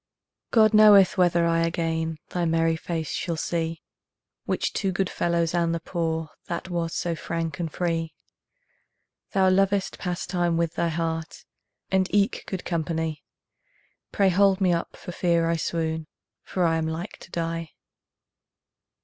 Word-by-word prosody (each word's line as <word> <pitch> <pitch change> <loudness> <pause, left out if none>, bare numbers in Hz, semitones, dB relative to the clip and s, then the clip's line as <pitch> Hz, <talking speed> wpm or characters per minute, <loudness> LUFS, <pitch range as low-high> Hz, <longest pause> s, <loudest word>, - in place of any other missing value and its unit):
God 220 -2 +5
knoweth 210 -3 +7
whether 175 -2 +3
I 165 0 +2
again 165 -1 -1
Thy 175 - -2
merry 165 0 +2
face 160 -1 -4
shall 170 -2 -2
see, 165 0 -2 0.6
Which - - -1
to 195 -2 0
good 185 0 -1
fellows 170 -1 0
and 170 -1 +1
the - - -2
poor 160 -2 -2 0.2
That 175 +2 -4
was 170 -1 -2
so 170 - -1
frank 165 -1 -4
and 165 -3 -2
free. 165 -2 -2 1.2
Thou 190 -2 +4
lovedst 195 +1 +1
pastime 175 -1 -1
with 170 -1 0
thy 170 - 0
heart, 165 0 -3 0.5
And 190 -1 +3
eke 200 -1 +1
good 190 -2 -5
company; 160 -2 -2 0.9
Pray 195 -1 +3
hold 195 +1 +4
me 185 -3 +3
up 170 - -3
for - - -8
fear 170 -2 +1
I 165 0 +1
swoon, 160 -1 -2 0.3
For 185 - -2
I 165 -1 +3
am 160 0 -1
like 165 +5 -5
to - - -13
die. 165 -2 -3
170 Hz, 150 wpm, -25 LUFS, 165-180 Hz, 1.2 s, knoweth